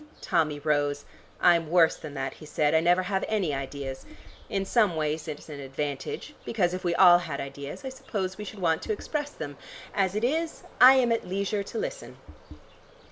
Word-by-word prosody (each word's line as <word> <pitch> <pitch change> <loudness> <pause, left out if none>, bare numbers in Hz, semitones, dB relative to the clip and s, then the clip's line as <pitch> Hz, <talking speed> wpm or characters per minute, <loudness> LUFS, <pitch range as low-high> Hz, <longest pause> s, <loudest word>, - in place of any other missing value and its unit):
Tommy 160 -5 +1
rose. 145 -1 0 0.3
"I'm 170 -3 +4
worse 170 -1 +5
than 150 -2 -9
that," 135 -1 -3
he - - -13
said. 150 0 +1
"I 160 - +5
never 175 +3 +3
have 190 +1 -1
any 195 -9 0
ideas. 135 -1 -5 0.5
In 195 -1 -1
some 210 -4 +2
ways 155 +1 -2
it's 150 -2 -7
an 150 -3 -8
advantage, 140 - -4
because 180 -6 0
if 185 - -4
we 175 -1 +1
all 175 -1 +8
had 160 -5 -5
ideas, 140 - -7
I - - -2
suppose 195 -7 -4
we 210 - -7
should 210 +1 -8
want 165 -4 +1
to 435 - -2
express 300 -8 -3
them. 145 - -7 0.4
As 195 -1 +1
it 210 - -1
is 320 +6 -1 0.2
I 260 +1 +10
am 250 -3 +3
at 230 - 0
leisure 200 +2 -1
to 200 - -7
listen." - - -5
175 Hz, 190 wpm, -27 LUFS, 150-210 Hz, 0.5 s, I